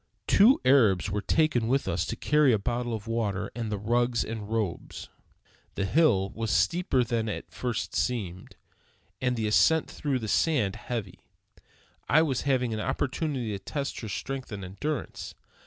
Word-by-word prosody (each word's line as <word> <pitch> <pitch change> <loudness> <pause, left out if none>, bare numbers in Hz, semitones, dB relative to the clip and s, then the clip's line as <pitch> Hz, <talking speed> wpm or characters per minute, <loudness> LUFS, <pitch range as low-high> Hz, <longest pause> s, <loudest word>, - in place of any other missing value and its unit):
Two 225 +7 +6
Arabs 110 -8 +4
were 105 +1 -1
taken 150 -4 +2
with 135 +3 +1
us 85 0 -1
to - - -3
carry 150 -3 +3
a 110 - +4
bottle 120 +3 -2
of 105 -2 -7
water 105 -4 -2
and 115 -2 -4
the 105 - -1
rugs 120 +3 +1
and 110 -2 -6
robes. 110 -6 -3 0.7
The 100 - -1
hill 100 - +3
was 115 -1 -3
steeper 170 -7 +2
than 115 -2 -1
it - - -4
at - - -36
first 120 -3 -3
seemed; 95 -7 -2 0.7
and 125 -1 +1
the 110 -2 -2
ascent 160 +9 +3
through 140 -3 -1
the 115 -3 -5
sand 110 - +1
heavy. 110 -7 -5 0.9
I 160 - +5
was 135 -6 -1
having 125 -3 +1
an 110 - -3
opportunity 130 0 -2
to 100 - -4
test 140 +7 -4
her 110 - -6
strength 130 +6 -5
and 100 -2 -5
endurance. 145 +12 -5
115 Hz, 170 wpm, -28 LUFS, 105-135 Hz, 0.9 s, Two